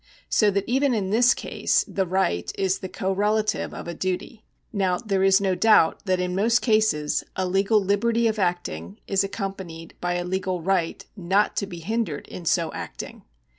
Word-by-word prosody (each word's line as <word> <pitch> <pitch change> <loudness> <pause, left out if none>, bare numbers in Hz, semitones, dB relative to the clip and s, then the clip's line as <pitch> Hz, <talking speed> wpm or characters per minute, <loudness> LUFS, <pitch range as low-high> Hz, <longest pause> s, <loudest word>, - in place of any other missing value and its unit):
So 210 - +4
that 200 -1 0
even 265 +2 +2
in 195 -3 -1
this 240 +3 +5
case - - 0
the 190 -2 -1
right 180 - 0
is 190 -1 0
the 185 - -6
correlative 210 +3 0
of - - -8
a 170 - -4
duty. 185 +6 -4 0.3
Now 190 -3 +1
there 195 -4 -1
is 195 +1 +5
no 195 -2 +1
doubt 210 -4 +4
that 185 -1 +2
in 180 0 -1
most 230 +5 +2
cases 215 -10 +2
a 185 - -1
legal 195 +4 +3
liberty 225 +4 +1
of 220 -1 -1
acting 105 - -2
is 195 -1 +1
accompanied 190 -5 -6
by 175 0 -1
a 175 0 -2
legal 185 0 -2
right 175 -1 -1
not 195 +2 +1
to 200 - -1
be 175 -3 -8
hindered 215 -5 -2
in 175 - -8
so 165 -1 +1
acting. - - -7
190 Hz, 180 wpm, -24 LUFS, 180-215 Hz, 0.3 s, this